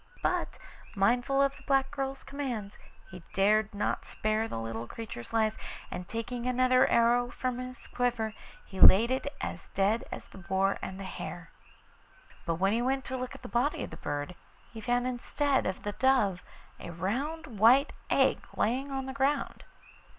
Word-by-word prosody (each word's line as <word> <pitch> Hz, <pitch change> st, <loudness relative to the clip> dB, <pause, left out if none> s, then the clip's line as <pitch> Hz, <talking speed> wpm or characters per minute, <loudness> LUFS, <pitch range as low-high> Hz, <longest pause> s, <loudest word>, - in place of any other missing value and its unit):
But -, -, 0 dB, 0.4 s
mindful 245 Hz, +7 st, +3 dB
of 275 Hz, 0 st, +1 dB
the -, -, -15 dB
black 270 Hz, -1 st, +2 dB
girl's 270 Hz, -1 st, -3 dB
commands, 245 Hz, -8 st, -5 dB, 0.3 s
he 185 Hz, -2 st, -9 dB
dared 215 Hz, +2 st, +3 dB
not 205 Hz, -, -1 dB
spare 215 Hz, +1 st, -1 dB
the -, -, -5 dB
little 115 Hz, +1 st, -4 dB
creature's 210 Hz, -, -7 dB
life, 220 Hz, -1 st, +2 dB, 0.4 s
and 180 Hz, 0 st, -5 dB
taking 235 Hz, +2 st, -4 dB
another 255 Hz, 0 st, +4 dB
arrow 240 Hz, +1 st, +3 dB
from 250 Hz, 0 st, -3 dB
his 255 Hz, 0 st, -7 dB
quiver 240 Hz, -3 st, -1 dB, 0.3 s
he 190 Hz, -, -9 dB
laid 230 Hz, +6 st, +8 dB
it 260 Hz, +2 st, -1 dB
as -, -, -5 dB
dead 205 Hz, +4 st, +2 dB
as -, -, -6 dB
the -, -, -13 dB
boar 190 Hz, +2 st, 0 dB
and 190 Hz, 0 st, -6 dB
the -, -, -5 dB
hare. 175 Hz, -2 st, -7 dB, 1.0 s
But 165 Hz, -, +1 dB
when 195 Hz, +4 st, +2 dB
he 230 Hz, -, +1 dB
went 265 Hz, +2 st, 0 dB
to 260 Hz, -, -4 dB
look 255 Hz, -1 st, -4 dB
at -, -, -13 dB
the -, -, -6 dB
body 245 Hz, +5 st, 0 dB
of -, -, -7 dB
the -, -, -8 dB
bird 145 Hz, +3 st, -4 dB, 0.4 s
he 225 Hz, -, -7 dB
found 245 Hz, +3 st, +1 dB
instead 265 Hz, +2 st, 0 dB
of 185 Hz, -, -4 dB
the 205 Hz, -, -2 dB
dove 210 Hz, -5 st, +2 dB, 0.4 s
a -, -, -7 dB
round 245 Hz, -, -2 dB
white 250 Hz, +6 st, +6 dB, 0.2 s
egg -, -, +3 dB, 0.2 s
lying 260 Hz, +6 st, 0 dB
on 270 Hz, -1 st, -2 dB
the 265 Hz, -, -5 dB
ground. 275 Hz, +1 st, 0 dB
235 Hz, 175 wpm, -30 LUFS, 195-260 Hz, 1.0 s, laid